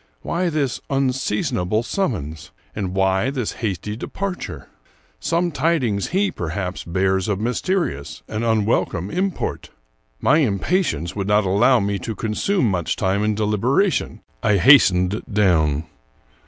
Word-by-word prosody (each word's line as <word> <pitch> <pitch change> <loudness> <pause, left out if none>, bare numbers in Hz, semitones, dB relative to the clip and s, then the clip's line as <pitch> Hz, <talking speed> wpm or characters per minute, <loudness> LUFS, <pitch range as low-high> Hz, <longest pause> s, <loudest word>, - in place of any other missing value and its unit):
Why 175 +1 0
this 145 -6 -1
unseasonable 125 -6 0
summons? 80 - -3 0.3
and 95 -3 -3
why 95 +4 +2
this 130 -5 -2
hasty 105 -1 -4
de 115 - -6
parture? 195 -2 -5 0.5
Some 170 +1 0
tidings 135 - 0
he, 195 +3 +1
perhaps, 90 +2 -4
bears 95 +2 0
of 100 -3 -1
mysterious 125 - -2
and 110 +1 -3
unwelcome 105 -5 0
import. 190 0 -2 0.5
My 150 +4 +4
impatience 100 - 0
would 100 -1 -3
not 105 0 +3
allow 115 +7 +4
me 100 -1 -1
to 110 +5 -5
consume 120 - 0
much 90 -5 -1
time 95 +2 0
in 105 0 +1
deliberation; 115 - +1 0.2
I 105 - +3
hastened 95 -4 +5
down. 80 -8 +2
105 Hz, 125 wpm, -21 LUFS, 95-135 Hz, 0.5 s, hastened